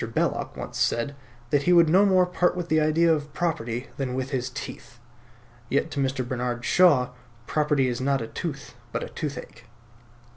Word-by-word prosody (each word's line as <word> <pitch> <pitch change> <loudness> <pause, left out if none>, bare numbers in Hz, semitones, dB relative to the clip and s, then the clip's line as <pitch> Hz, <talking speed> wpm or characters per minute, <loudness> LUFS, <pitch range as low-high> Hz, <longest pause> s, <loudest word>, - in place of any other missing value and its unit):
Belloc - - -1
once - - -6
said 130 +5 0 0.4
that 145 - +3
he 180 +5 +3
would 170 -1 +6
no 190 +6 +5
more 185 -2 +4
part 180 0 +1
with 175 -1 -4
the 155 0 +3
idea 160 +2 +4
of 150 -1 -3
property 125 -8 -2
than 130 -2 -2
with 130 +1 -3
his 130 -1 -1
teeth; 130 -2 -8 0.7
yet 145 +3 0
to 145 - -3
Mr. 135 -2 -1
Bernard 120 -1 -3
Shaw 145 -9 +5 0.4
property 150 -2 +1
is 125 0 -2
not 135 +1 +1
a 115 - -4
tooth, 140 +3 -6 0.2
but - - -2
a - - -6
toothache. - - -6
140 Hz, 180 wpm, -25 LUFS, 125-165 Hz, 0.7 s, would